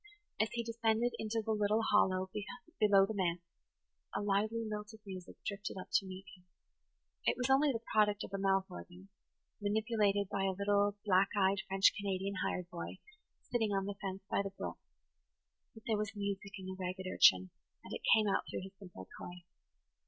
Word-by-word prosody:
As 220 +1 +2
he 235 0 -1
descended 230 +1 +1
into 220 +1 -1
the 225 - 0
little 210 +1 +2
hollow 190 -3 +2 0.5
below 200 -3 +6
the 220 - -4
manse 175 -3 -1 0.7
a - - +1
lively 215 +3 +1
lilt 210 0 -5
of - - -16
music 185 -2 -8
drifted 200 -1 -4
up 185 - -7
to 195 - +3
meet 190 +1 -8
him. 180 -1 -23 0.8
It - - +2
was 250 +1 0
only 280 +2 +5
the 230 -2 -4
product 210 -1 +3
of - - -8
a 195 - -1
mouth 195 -1 +2
organ, 180 +1 -11 0.5
manipulated 205 -1 +1
by 195 0 -1
a 190 -1 0
little 205 0 +2
black 190 -1 +4
eyed, 195 0 +3
French 195 +1 +5
Canadian 195 -1 -2
hired 180 -1 -2
boy, 170 - -6 0.5
sitting 225 -4 +1
on 195 -1 0
the 205 - -3
fence 195 -1 -4
by - - +1
the 200 - -3
brook; 195 - -6 1.0
but 220 - -13
there 220 -2 +1
was 210 0 -3
music 200 -1 -3
in 190 - -8
the 190 0 -5
ragged 185 +1 -4
urchin 95 - +5 0.3
and - - -8
it - - -4
came 220 -1 +3
out 195 - +1
through - - -4
his 190 +1 -9
simple 180 - -10
toy. 180 0 -8
200 Hz, 185 wpm, -34 LUFS, 190-215 Hz, 1.0 s, below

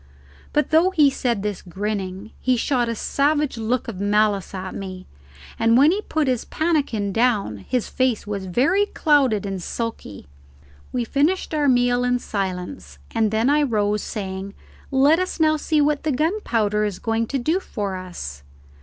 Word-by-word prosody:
But 300 +1 +1
though 325 +4 +5
he 305 -7 +4
said 235 -6 -1
this 210 -2 -3
grinning, 195 +2 -4
he 255 -1 +1
shot 245 -1 +1
a 230 - -2
savage 290 +5 +1
look 230 +2 -1
of 210 -5 -6
malice 205 -1 +1
at 185 0 -5
me, 185 -1 -7 0.5
and 230 +1 +4
when 290 +5 +6
he 400 +3 0
put 315 -7 -1
his 250 -3 0
pannikin 280 - -1
down 225 - +1
his 250 -3 0
face 255 -4 0
was 200 -2 -4
very 280 - +2
clouded 270 - +2
and 195 -2 -4
sulky. 225 - -5 0.7
We 245 - -1
finished 300 +9 0
our 295 -2 +2
meal 245 -1 +3
in 250 0 +2
silence, 180 - -4 0.2
and 220 -1 +2
then 220 +3 +1
I 295 +2 +4
rose, 210 -6 +1
saying, 195 -1 -5 0.3
"Let 280 +5 +4
us 370 -1 -3
now 310 -1 +4
see 305 0 +1
what 295 0 +1
the 310 - -1
gunpowder 245 - 0
is 205 -3 -2
going 225 0 -1
to 275 - -1
do 315 +9 +1
for 205 - -4
us." 175 - -7
230 Hz, 170 wpm, -22 LUFS, 200-290 Hz, 0.7 s, when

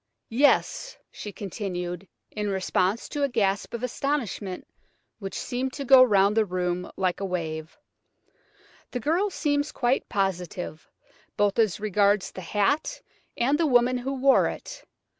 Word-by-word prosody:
Yes!" 290 - +2
she 210 - -7
continued, 185 -2 -5 0.2
in 210 -1 -2
response 190 +2 0
to 290 - -3
a 280 - +2
gasp 200 -5 0
of 235 - -6
astonishment 240 -7 -2 0.5
which 195 -2 -5
seemed 255 +1 -3
to 280 - -5
go 265 0 +8
round 205 -4 +5
the 225 - +4
room 180 -2 -2
like 185 -2 0
a 200 - -2
wave, 160 -3 -4 1.1
"the 250 - -3
girl 340 - +1
seems 290 -5 0
quite 250 +1 0
positive, 180 -4 -3 0.5
both 205 +1 +2
as 215 -5 +2
regards 205 -1 +2
the 185 - -8
hat 210 - 0 0.4
and 275 +6 +2
the 330 - +3
woman 250 -1 +3
who 265 +3 -3
wore 270 +1 +4
it. - - -7
210 Hz, 140 wpm, -26 LUFS, 190-265 Hz, 1.1 s, go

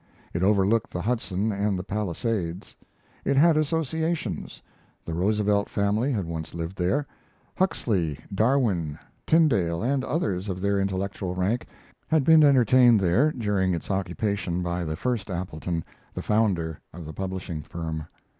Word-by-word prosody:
It 85 - -1
overlooked 100 +2 +3
the 90 - -4
Hudson 110 -3 -1
and 100 -1 0
the 90 - -4
Palisades. 100 -2 -3 0.5
It 140 - +1
had 160 +3 +6
associations: 160 - -1 0.5
the 85 - -4
Roosevelt 100 +3 +1
family 105 +6 +1
had 105 -8 -1
once 80 -1 -5
lived 85 +2 -4
there, 95 +12 0 0.5
Huxley, 95 - 0 0.2
Darwin, 100 - +1 0.3
Tyndall, 110 - +3
and 130 +2 +1
others 100 - -1
of 95 -1 -3
their 100 +1 +1
intellectual 95 -1 -2
rank 100 +7 0 0.4
had 155 -3 +3
been 160 +2 +7
entertained 125 -4 +6
there 100 - +3
during 100 - 0
its 85 - -5
occupation 95 -1 -1
by 85 0 -2
the 80 -1 -3
first 110 +1 -2
Appleton, 85 -2 -3 0.3
the - - -4
founder 95 -8 +1
of 85 0 -9
the 80 - -7
publishing 95 -4 -4
firm. 80 0 -5
100 Hz, 140 wpm, -26 LUFS, 90-120 Hz, 0.5 s, been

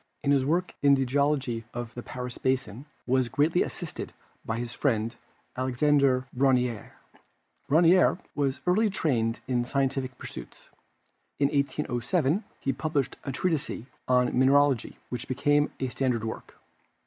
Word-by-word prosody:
Cuvier - - -45
in 140 - +2
his 135 -2 +3
work 175 +3 0
on 140 -1 +6
the 135 -1 0
geology 135 -3 0
of 120 -1 -5
the 120 - -6
Paris 125 0 -6
basin 130 0 -1 0.2
was 130 -1 +1
greatly 150 +7 +2
assisted 175 -4 -4 0.3
by 110 - -3
his 120 0 -4
friend, 115 -4 0 0.4
Alexandre 130 0 +2
Brongniart. 125 -4 +1 0.8
Brongniart 170 +5 +5 0.2
was 140 -2 -1
early 210 +5 +3
trained 125 - 0
in 125 -1 +1
scientific 135 0 -1
pursuits. 60 - -10 0.7
In 140 -1 +2
1807 145 - 0 0.2
he 135 - -1
published 140 0 -2
a 135 - -2
treatise 150 -4 -2 0.2
on 125 -1 +3
mineralogy, 135 -1 +3
which 125 -1 -5
became 145 +3 +2
a 130 - -1
standard 125 -3 -1
work. 110 - -6
135 Hz, 135 wpm, -27 LUFS, 125-145 Hz, 0.8 s, on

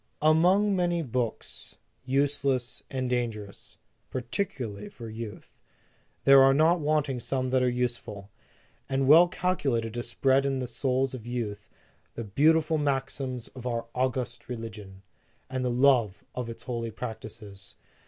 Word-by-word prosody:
"Among 180 +6 +4
many 175 -2 +1
books, 125 -4 -4 0.3
useless 135 -2 0
and 130 -1 -2
danger 120 -4 -1
* - - -13
ous, - - -15 0.3
particularly 120 - -4
for 115 -1 -9
youth, 110 -3 -8 0.6
there 135 0 +8
are 135 0 +6
not 165 +4 +4
wanting 145 -4 0
some 130 +1 -1
that 130 0 +3
are 125 - +3
useful, 120 -5 -3 0.6
and 135 0 +1
well 165 +5 +8
cal 180 +1 0
culated 115 -8 -1
to 120 - -2
spread 135 +3 +2
in 135 -1 0
the 130 - -2
souls 130 +2 0
of 120 -3 -8
youth 110 -4 -4 0.5
the 115 - -4
beautiful 155 +8 +3
maxims 135 -3 -2
of 125 -1 -8
our 115 -1 -2
august 125 -1 -2
religion, 105 -5 -7 0.5
and 130 -1 -2
the 125 - +1
love 120 -5 +3
of 125 -2 -4
its 115 - -8
holy 115 -2 -3
practices. 110 -4 -8
125 Hz, 145 wpm, -28 LUFS, 115-140 Hz, 0.6 s, there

